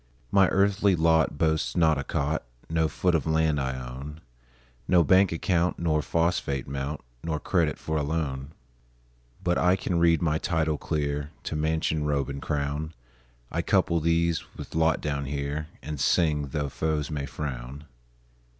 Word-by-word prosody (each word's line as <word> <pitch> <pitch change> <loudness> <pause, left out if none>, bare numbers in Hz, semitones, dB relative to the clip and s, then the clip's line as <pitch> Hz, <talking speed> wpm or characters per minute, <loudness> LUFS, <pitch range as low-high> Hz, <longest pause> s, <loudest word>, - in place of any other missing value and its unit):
My 95 -1 +5
earthly 100 0 +3
lot 80 -2 +3
boasts 80 -6 0
not 80 -3 +4
a - - -2
cot, 75 +3 -1 0.3
No 80 -1 +2
foot 90 +3 0
of 80 -4 +1
land 80 -2 +2
I 65 0 -2
own, 65 +5 -8 0.7
No 90 -2 +5
bank 95 +3 +5
account 85 +1 +1
nor 80 -3 +1
phosphate 75 -3 0
mount, 70 +2 -4 0.2
Nor 80 -2 -2
credit 85 -4 +1
for 80 0 -3
a - - +1
loan; 70 -2 -2 0.9
But 90 0 +1
I 90 +1 +4
can 90 -2 -1
read 85 -1 +4
my 80 -2 +1
title 80 -3 0
clear 75 -1 -2
To - - -4
mansion, 80 0 0
robe, 70 -2 0
and 70 0 -5
crown; 75 +1 -2 0.6
I - - 0
couple 85 - +2
these 85 0 +1
with - - -8
lot 80 0 +2
down 70 -2 -2
here, 70 +2 -3 0.2
And 75 0 -5
sing, 75 0 +2
tho' 70 +1 -2
foes 80 +1 -1
may 70 -2 -3
frown. 70 0 -6
80 Hz, 160 wpm, -27 LUFS, 70-85 Hz, 0.9 s, My